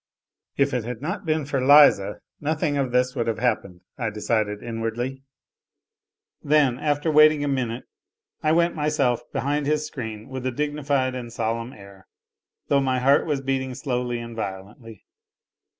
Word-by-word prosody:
"If 140 0 +2
it 125 -3 0
had 120 0 -5
not 170 - -4
been 155 -2 0
for 135 -2 -1
Liza 135 -8 +6 0.2
nothing 155 0 -1
of 135 -3 -1
this 125 +1 +1
would 115 - -1
have 115 -1 -1
happened," 105 -6 -1 0.2
I 115 -3 -1
decided 105 -1 -1
inwardly. 120 +3 -4 1.2
Then, 140 -4 +2
after 150 +1 0
waiting 155 -1 +6
a - - -1
minute, 125 -3 -2 0.6
I 155 - +2
went 170 +1 +3
myself 150 -6 0
behind 145 +2 -1
his 150 0 +1
screen 110 -5 -7
with 130 -1 -6
a - - 0
dignified 145 -1 -1
and 120 -2 -6
solemn 115 +1 -2
air, 100 -4 -15 0.6
though 140 -1 +3
my 130 -1 +1
heart 135 +5 +3
was 145 -3 -1
beating 130 -1 -2
slowly 125 -3 -2
and 115 -1 -7
violently. 105 +2 -7
130 Hz, 155 wpm, -24 LUFS, 115-145 Hz, 1.2 s, Liza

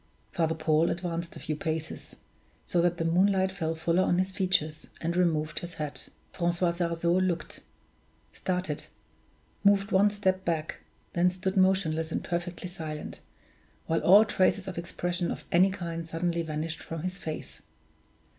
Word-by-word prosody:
Father 160 -1 +1
Paul 160 +1 +2
advanced 170 -1 -3
a - - -8
few 155 - -3
paces, 160 +1 -4 0.5
so 175 - +1
that 175 0 +2
the 165 - -1
moonlight 190 +3 +3
fell 165 -4 -2
fuller 165 +3 +2
on 175 - +2
his 185 +1 +1
features, 170 -5 0
and 170 +1 -2
removed 155 -4 +1
his 175 0 -8
hat. 150 -2 -5 0.2
Francois 175 0 +1
Sarzeau 170 0 0
looked, 175 -4 -2 0.7
started, 180 -5 -2 0.8
moved 200 0 +4
one 200 +2 +5
step 190 -2 0
back, 165 -3 -2 0.3
then 175 +1 +4
stood 185 +1 -2
motionless 185 -4 +2
and - - -2
perfectly 175 +1 -3
silent, 160 -4 -6 0.7
while 165 - +1
all 205 +4 +8
traces 190 -1 +1
of 180 -3 -4
expression 175 0 -2
of - - -5
any 185 +3 +5
kind 170 -3 -4
suddenly 170 +1 -1
vanished 160 0 -4
from 165 -1 -6
his 185 +1 -4
face. 155 -3 -6
170 Hz, 150 wpm, -29 LUFS, 165-185 Hz, 0.8 s, all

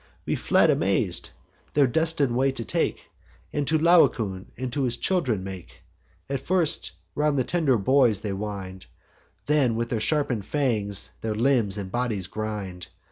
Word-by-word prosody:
We - - 0
fled - - +3
amaz'd; - - 0 0.5
their 145 -2 +5
destin'd 145 -1 +1
way 135 +2 +3
they 130 -3 -4
take, - - -2 0.4
And 145 -2 -1
to 160 +2 +3
Laocoon 120 - +3
and 125 -1 -4
his 130 -4 -1
children 130 - 0
make; 95 -2 -9 0.4
And 140 -1 -2
first 170 +2 0 0.2
around 150 0 +1
the 130 - +2
tender 150 -5 +2
boys 115 -1 +3
they 100 -2 -3
wind, 95 -2 -6 0.6
Then 140 -6 +2
with 115 +1 -2
their 115 - -1
sharpen'd 125 -4 0
fangs 110 -9 0
their 110 -1 -2
limbs 115 -4 +2
and 95 -2 -5
bodies 115 -5 -1
grind. 100 -3 -5
120 Hz, 150 wpm, -25 LUFS, 105-140 Hz, 0.6 s, their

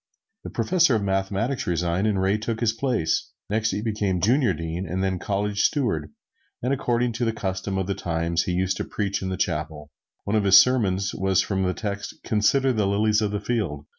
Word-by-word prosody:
The - - -6
professor 170 -8 +2
of 105 - 0
mathematics 100 +6 -1
resigned 85 +3 0
and 100 -3 +1
Ray 95 +3 +1
took 115 +1 -3
his 115 -2 +1
place; 115 -9 0 0.2
next 110 +1 +1
he 105 - -2
became 105 -5 -1
Junior 120 - +3
Dean, 85 +2 -4
and 95 +3 -1
then 95 -1 -1
College 100 +1 -1
Steward; 100 - 0 0.5
and 130 +2 +1
according 125 -2 0
to 115 - -3
the 115 - +1
custom 95 -2 -3
of 95 - -1
the 100 - -1
times 85 -1 -1
he - - -1
used 95 +1 0
to - - -2
preach 100 -2 -2
in 95 - -3
the 95 - -3
chapel. 75 -1 -3 0.3
One 100 - -1
of 105 -2 +2
his 100 0 +8
sermons 100 -7 +3
was 95 -1 +2
from 95 -2 -1
the 90 -1 0
text, 100 -2 -4
"Consider 130 +5 +2
the 105 -3 +1
lilies 105 +2 +2
of 105 - +1
the 105 0 -2
field." 100 -10 -2
100 Hz, 205 wpm, -24 LUFS, 95-110 Hz, 0.5 s, his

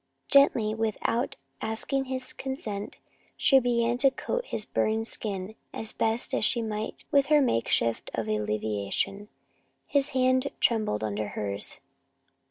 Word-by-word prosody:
Gently, 240 -6 +5
without 225 +2 -1 0.3
asking 245 +5 -1
his 260 0 -4
consent, 220 -7 -5 0.4
she 270 - +6
began 240 -1 +1
to 275 - +6
coat - - -3
his 215 - -3
burned 220 +1 0
skin 200 -3 -4 0.2
as 220 -1 -5
best 225 +1 -1
she 235 +3 +3
might 215 -1 -4
with 280 -2 +4
her 300 +1 +6
makeshift 115 - +1
of 115 -1 -2
alleviation. 105 - -1 0.6
His 280 -1 +2
hand 255 +1 +2
trembled 215 - +1
under 105 0 -2
hers. 100 -1 -3
220 Hz, 125 wpm, -28 LUFS, 190-260 Hz, 0.6 s, she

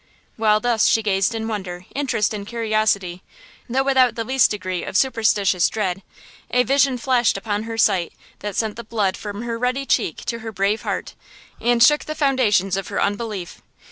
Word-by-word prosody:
While 215 -1 +3
thus 230 -1 +2
she 225 - +3
gazed 195 +2 +1
in 220 0 -3
wonder, 185 -5 -5
interest 255 -7 0
and 200 -1 -6
curiosity, 215 -6 0 0.5
though 265 +3 +1
without 260 -3 +3
the 230 - -2
least 260 +2 +3
degree 185 -4 -3
of - - -2
superstitious 210 -7 +2
dread, 195 -3 -2 0.5
a 250 0 +3
vision 270 0 +2
flashed 245 -3 +2
upon 205 +1 -3
her 225 - -4
sight 190 -6 +2 0.3
that 205 -1 -5
sent 220 -1 -1
the 235 - -6
blood 205 -4 -1
from 205 +1 -6
her 230 -1 -4
ruddy 255 +3 -1
cheek - - -1
to 230 - -3
her 225 0 -6
brave 200 +2 0
heart, - - -4 0.5
and 240 -1 +3
shook 295 +4 +5
the 310 - -5
foundations 215 - +2
of 195 - -4
her - - -3
unbelief! 205 -3 -3
220 Hz, 180 wpm, -21 LUFS, 200-240 Hz, 0.5 s, shook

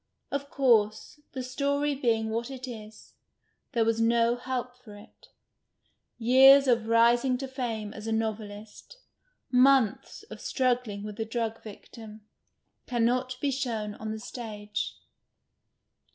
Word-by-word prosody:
Of 280 0 -3
course, 230 +1 +1
the 260 -2 -4
story 285 +3 -1
being 225 -5 0
what 230 +2 -2
it 260 -1 -7
is, 220 -3 -11 0.6
there 230 -2 +2
was 225 0 +1
no 230 +1 +3
help 250 0 -4
for 235 -5 -14
it. 205 +3 -17 0.9
Years 265 +4 +7
of 235 -3 +2
rising 240 +3 +3
to 270 +1 -5
fame 230 -5 -4
as 210 +1 -8
a - - -2
novelist, 220 - -5 0.5
months 255 - +3
of - - -9
struggling 245 -6 -1
with 210 +1 -8
a 225 - -1
drug 225 0 -3
victim, 215 0 -12 0.7
cannot 250 +1 0
be 285 - +1
shown 230 -6 -3
on 220 +1 -7
the 220 - -4
stage. 210 -3 -5
235 Hz, 130 wpm, -28 LUFS, 220-255 Hz, 0.9 s, Years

